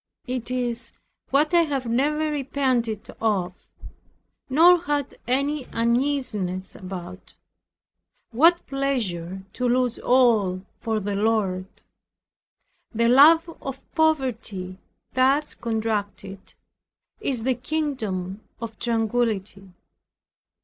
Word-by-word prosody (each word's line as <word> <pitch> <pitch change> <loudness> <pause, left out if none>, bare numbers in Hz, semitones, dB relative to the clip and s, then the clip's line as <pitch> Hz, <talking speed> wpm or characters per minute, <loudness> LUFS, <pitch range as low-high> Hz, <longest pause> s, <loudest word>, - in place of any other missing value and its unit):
It 250 -2 -4
is 240 -2 -2 0.4
what 295 +5 +2
I 345 - +6
have 280 -5 -1
never 300 +6 +1
repented 255 -6 -1
of, 195 -5 0 1.0
nor 335 +6 +6
had 290 -3 -2
any 275 +2 0
uneasiness 230 -6 -1
about. 185 0 -9 1.0
What 330 +9 +4
pleasure 195 -10 -2
to 250 -1 -1
lose 250 -1 +1
all 215 -7 +3
for 220 -1 -1
the 205 0 -3
Lord! 200 -3 0 1.2
The 235 0 +2
love 310 +7 +7
of 270 0 -5
poverty, 240 - -1 0.3
thus 270 +3 +2
contracted, 210 -4 -4 0.6
is 250 -5 -2
the 260 +1 +2
kingdom 230 - -3 0.2
of 225 -2 -7
tranquillity. 220 -4 -1
235 Hz, 95 wpm, -24 LUFS, 205-275 Hz, 1.2 s, love